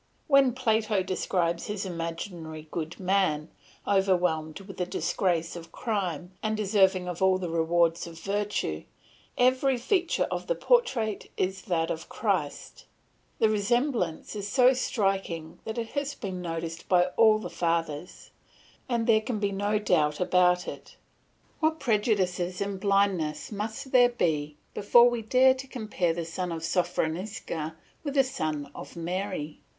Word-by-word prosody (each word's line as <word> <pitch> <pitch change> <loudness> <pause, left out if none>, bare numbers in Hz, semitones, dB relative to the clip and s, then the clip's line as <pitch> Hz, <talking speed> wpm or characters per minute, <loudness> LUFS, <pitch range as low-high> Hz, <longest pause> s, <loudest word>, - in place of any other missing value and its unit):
When 275 -3 +5
Plato 220 -5 +1
describes 175 -2 -1
his 205 -1 -3
imaginary 165 -2 -5
good 165 0 -4
man, 185 -5 +1 0.4
overwhelmed 180 -5 +1
with 195 -1 -11
the 180 - 0
disgrace 170 -3 -1
of 165 -1 -9
crime, 185 - -3
and 215 0 -1
deserving 190 -3 +3
of 180 0 -5
all 190 0 +4
the 180 -3 -4
rewards 170 0 +2
of 165 -1 -10
virtue, 200 - -2 0.5
every 255 +1 +3
feature 345 - +1
of - - -3
the - - +1
portrait 255 - +1
is 190 +1 -1
that 165 -5 0
of 160 - -5
Christ; 185 -10 -2 0.5
the 220 - +4
resemblance 215 - 0
is 205 -1 -4
so 255 +3 +5
striking 195 -9 -1
that 220 - -4
it 230 -1 -3
has 285 0 -3
been 190 -4 -5
noticed 165 -1 -5
by 180 -1 +5
all 220 -1 +6
the 215 - -5
Fathers, 165 -1 -2 0.6
and 235 -2 +1
there 220 -2 +4
can 225 0 -3
be 205 -1 0
no 205 +2 0
doubt 155 -8 +1
about 180 0 +3
it. - - -8 0.6
What 315 0 +1
prejudices 185 -5 0
and 200 -1 -3
blindness 190 -6 +1
must 220 +5 -5
there 245 -1 +6
be 150 -10 -1 0.2
before 235 +4 +6
we 240 -1 -2
dare 255 +4 +5
to 265 +1 -8
compare 215 -9 -1
the 170 -1 -3
son 175 +2 -4
of 165 -1 -4
Sophronisca 170 -2 -2 0.3
with 285 -2 -4
the 270 - +6
son 155 - -3
of - - -10
Mary. 175 -2 -4
190 Hz, 145 wpm, -28 LUFS, 170-220 Hz, 0.6 s, all